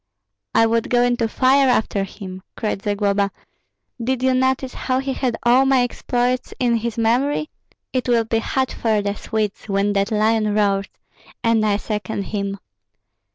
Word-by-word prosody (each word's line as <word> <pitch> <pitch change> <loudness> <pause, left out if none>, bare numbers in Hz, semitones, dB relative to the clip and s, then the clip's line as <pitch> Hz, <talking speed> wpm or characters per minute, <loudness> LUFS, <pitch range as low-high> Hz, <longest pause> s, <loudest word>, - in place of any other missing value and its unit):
"I 225 - +6
would 230 0 0
go 245 0 +3
into 245 -2 +1
fire 265 +4 +3
after 215 -4 +1
him!" 190 -1 -9 0.2
cried 210 -3 -2
Zagloba. 200 -1 +1 0.7
"Did 255 +1 -1
you 260 0 +3
notice 260 0 +1
how 255 -1 -1
he 270 0 -1
had 250 -3 -1
all 255 +3 +5
my 265 -2 +4
exploits 245 +1 -1
in 240 -2 +2
his 230 0 -4
memory? 255 +7 +1 0.4
It 255 -1 -1
will 235 -1 +4
be 225 0 0
hot 260 +3 -1
for 215 -3 0
the 200 0 -1
Swedes 215 -1 -3
when 200 +1 +1
that 200 +1 +1
lion 215 0 +2
roars, 200 -1 +1 0.6
and 230 -1 +3
I 205 -1 +2
second 210 -1 -3
him. 200 -1 -3
225 Hz, 160 wpm, -21 LUFS, 205-250 Hz, 0.7 s, I